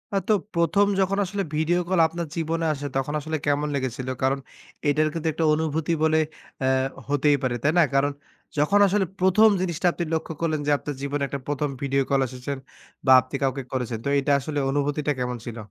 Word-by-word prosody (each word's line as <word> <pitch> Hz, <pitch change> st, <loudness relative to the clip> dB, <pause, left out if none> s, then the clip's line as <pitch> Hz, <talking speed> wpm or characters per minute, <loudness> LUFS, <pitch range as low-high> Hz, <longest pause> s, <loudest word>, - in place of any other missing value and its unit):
অ -, -, +4 dB
তো, 220 Hz, -, +4 dB, 0.2 s
১ম 170 Hz, +5 st, +3 dB
যখন 195 Hz, +1 st, +1 dB
আসলে 195 Hz, +2 st, -2 dB
ভিডিও 160 Hz, +3 st, +2 dB
কল 185 Hz, -2 st, +2 dB
আপনার 170 Hz, +1 st, -5 dB
জীবনে 165 Hz, 0 st, -1 dB
আসে, 145 Hz, -1 st, -6 dB
তখন 135 Hz, +2 st, -1 dB
আসলে 155 Hz, +2 st, -3 dB
কেমন 145 Hz, 0 st, +1 dB
লেগেছিল? 130 Hz, -1 st, -3 dB, 0.2 s
কারণ, 135 Hz, +1 st, +2 dB, 0.5 s
এটার 155 Hz, +2 st, +3 dB
কিন্তু 165 Hz, -1 st, -3 dB
একটা 160 Hz, +1 st, 0 dB
অনুভূতি 160 Hz, +1 st, 0 dB
বলে 160 Hz, 0 st, +4 dB, 0.4 s
অ্যা 130 Hz, -, +2 dB, 0.4 s
হতেই 145 Hz, 0 st, +3 dB
পারে, 125 Hz, -2 st, 0 dB
তাই 150 Hz, -, +4 dB
না? 175 Hz, -, +7 dB
কারণ 140 Hz, +1 st, +3 dB, 0.5 s
যখন 150 Hz, +8 st, +3 dB
আসলে 195 Hz, 0 st, +1 dB
১ম 190 Hz, +4 st, +5 dB
জিনিসটা 180 Hz, -1 st, 0 dB
আপনি 175 Hz, -, -3 dB
লক্ষ্য 160 Hz, 0 st, -2 dB
করলেন 155 Hz, -2 st, 0 dB
যে, -, -, +3 dB
আপনার 145 Hz, 0 st, -6 dB
জীবনে 140 Hz, +1 st, -2 dB
একটা 140 Hz, -, -4 dB
১ম 145 Hz, 0 st, -1 dB
ভিডিও 140 Hz, 0 st, +1 dB
কল 135 Hz, -1 st, +3 dB
এসেছে 130 Hz, +2 st, -5 dB, 0.5 s
বা, 130 Hz, -, +5 dB
আপনি 130 Hz, +2 st, -8 dB
কাউকে 135 Hz, 0 st, 0 dB
করেছেন। 125 Hz, -3 st, -2 dB
তো, -, -, +1 dB
এটা 140 Hz, +1 st, 0 dB
আসলে, 145 Hz, +2 st, -3 dB
অনুভূতিটা 145 Hz, +1 st, 0 dB
কেমন 125 Hz, 0 st, -2 dB
ছিল? 120 Hz, -1 st, -6 dB
150 Hz, 195 wpm, -24 LUFS, 140-165 Hz, 0.5 s, না